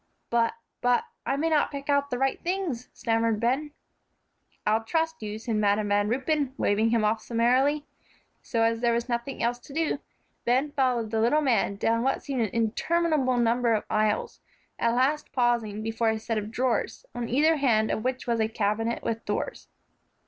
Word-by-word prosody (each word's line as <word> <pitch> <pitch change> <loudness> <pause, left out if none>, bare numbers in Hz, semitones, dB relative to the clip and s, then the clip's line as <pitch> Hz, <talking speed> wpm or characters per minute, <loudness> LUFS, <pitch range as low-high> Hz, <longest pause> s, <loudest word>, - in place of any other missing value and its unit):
"But, 230 -1 +2 0.3
but 245 0 +3 0.2
I 270 - +1
may 315 +3 +1
not 310 -2 +2
pick 280 -1 -7
out 280 -1 +2
the 245 - -2
right 270 +1 0
things," 345 -9 -2
stammered 225 -1 0
Ben. 260 +6 0 1.0
"I'll 220 +1 +2
trust 320 +6 -1
you," 210 0 -4
said 225 0 -2
Madam 205 0 +2
Van 205 0 +2
Ruypen, 270 +2 0
waving 215 +2 +2
him 225 -2 +2
off 215 +1 +1
summarily. 260 +6 +2 0.6
So 230 -2 0
as 230 0 +2
there 235 -1 +3
was 235 +1 -1
nothing 235 +2 -3
else 240 +1 0
to 275 - -13
do, 315 -2 0 0.4
Ben 260 +5 +1
followed 250 -6 0
the 220 -1 +1
little 290 +7 +3
man 230 -8 +1
down 230 +3 +1
what 270 +2 0
seemed 270 -3 -2
an 220 - +1
interminable 260 +4 +1
number 235 0 +2
of 210 - -1
aisles, 215 0 0 0.4
at 235 0 +2
last 275 +5 +1
pausing 235 -4 +1
before 225 +1 0
a 220 - 0
set 220 0 -2
of 210 0 -6
drawers, 250 - -1
on 240 -1 -4
either 305 +6 +3
hand 225 -6 +2
of 215 - -2
which 255 +1 -2
was 235 -1 0
a 220 - +2
cabinet 220 +2 -1
with 225 0 -2
doors. - - -3
235 Hz, 185 wpm, -27 LUFS, 225-270 Hz, 1.0 s, but